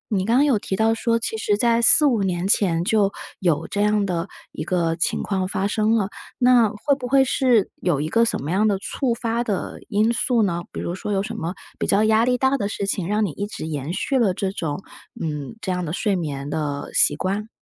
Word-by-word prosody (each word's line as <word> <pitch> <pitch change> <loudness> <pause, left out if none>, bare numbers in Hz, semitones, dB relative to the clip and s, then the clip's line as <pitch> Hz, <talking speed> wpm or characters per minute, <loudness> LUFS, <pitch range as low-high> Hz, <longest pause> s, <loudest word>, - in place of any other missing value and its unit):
你 190 0 0
刚 230 +2 +2
刚 290 - +5
有 250 -8 +2
提 190 - -3
到 225 +1 +2
说， 230 0 +1
其 225 -1 -3
实 205 -1 +1
在 235 +1 +2
四 300 +6 +7
五 235 -7 +2
年 185 -1 -1
前 175 -5 +2
就 200 0 +2 0.3
有 165 -4 0
这 205 - -2
样 210 -1 +2
的 175 -1 -2 0.2
一 - - -5
个 170 -3 0
情 170 - -1
况 190 -2 -1
发 195 0 -2
生 215 +2 +1
了， 200 -4 +1 0.3
那 245 -3 +5
会 215 +7 0
不 250 - -4
会 270 +1 +4
是 245 -5 +2
有 170 -6 +1
一 155 - -2
个 230 +4 +3
什 230 - 0
么 155 - -3
样 210 +3 +2
的 200 -2 +1
促 240 +4 -2
发 235 0 -1
的 205 -5 -3
因 215 +3 +2
素 235 -1 +1
呢？ 175 -3 -1
比 - - -6
如 170 - -3
说 210 +2 -5
有 195 0 +1
什 225 +1 -6
么 175 -3 -4 0.2
比 - - -1
较 205 +2 +3
压 220 +1 +4
力 250 0 +2
大 265 +2 +2
的 200 -4 -2
事 200 - -3
情 190 -3 -2
让 210 +1 +1
你 170 - -3
一 205 +6 -4
直 210 - -7
延 150 0 -4
续 250 +8 0
了 195 -6 +2
这 190 -1 -2
种， 160 -1 -4 0.4
嗯， 150 +4 -4
这 190 - -2
样 180 0 -2
的 155 - -4
睡 200 +2 0
眠 145 -5 -4
的 145 -2 -3
习 145 - +4
惯？ 200 +6 -3
205 Hz, 260 characters per minute, -22 LUFS, 175-230 Hz, 0.4 s, 四